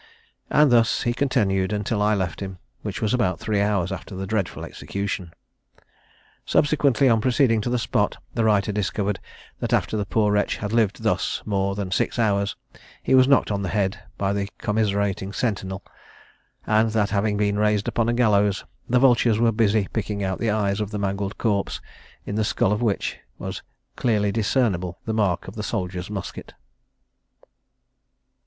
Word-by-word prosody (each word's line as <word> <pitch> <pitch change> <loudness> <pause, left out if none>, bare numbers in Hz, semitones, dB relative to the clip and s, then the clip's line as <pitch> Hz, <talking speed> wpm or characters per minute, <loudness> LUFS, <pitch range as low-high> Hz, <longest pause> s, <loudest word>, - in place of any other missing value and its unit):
And 150 -3 +5
thus 115 -1 +3
he 120 - +1
continued 105 -8 +1
until 105 +1 -1
I 105 +1 +3
left 95 -4 -2
him, 95 -2 -6 0.2
which - - -4
was 110 - +1
about 95 -9 +1
three 105 +1 0
hours 100 -3 +1
after 95 0 -6
the 95 +1 -4
dreadful 95 -5 -2
execution." 100 -3 -4 1.1
Subsequently, 140 -3 +3
on 115 -3 +4
proceeding 125 -2 +3
to 115 - -2
the 125 - +1
spot, 115 - 0 0.2
the 115 - 0
writer 105 -1 +2
discovered 100 0 -1 0.4
that - - -2
after - - +1
the 105 -2 -2
poor 105 +1 +2
wretch 105 0 +1
had 105 +1 -4
lived 110 -4 +1
thus - - 0
more 100 -1 0
than 100 -2 -4
six 95 - 0
hours, 100 -3 +1 0.5
he - - +1
was 130 0 +6
knocked 140 -5 +4
on 100 -1 -1
the 95 - -2
head 100 -1 0 0.2
by 100 0 0
the 100 -1 -2
commiserating 100 -2 -1
sentinel; 95 -3 -2 0.8
and 110 +1 +3
that 105 -2 +1
having 105 0 +1
been 105 0 +1
raised 105 -1 +2
upon 115 0 +1
a - - +2
gallows, 105 -4 +2 0.2
the 125 - +3
vultures 120 -3 +4
were 115 0 +3
busy 105 -2 +2
picking 105 -2 -2
out 95 -1 -2
the 115 - 0
eyes 105 -1 0
of 105 - -2
the 105 - -4
mangled 100 0 -2
corpse, 100 -4 0 0.5
in - - -4
the 110 +1 +1
skull 100 - +1
of 105 - 0
which 110 -5 -1 0.2
was - - -5 0.3
clearly 105 -4 +1
discernible 100 -5 0
the 110 - -2
mark 100 -6 0
of 95 - -7
the 110 - -5
soldier's 90 -4 -3
musket. 100 -3 -7
105 Hz, 175 wpm, -24 LUFS, 100-110 Hz, 1.1 s, was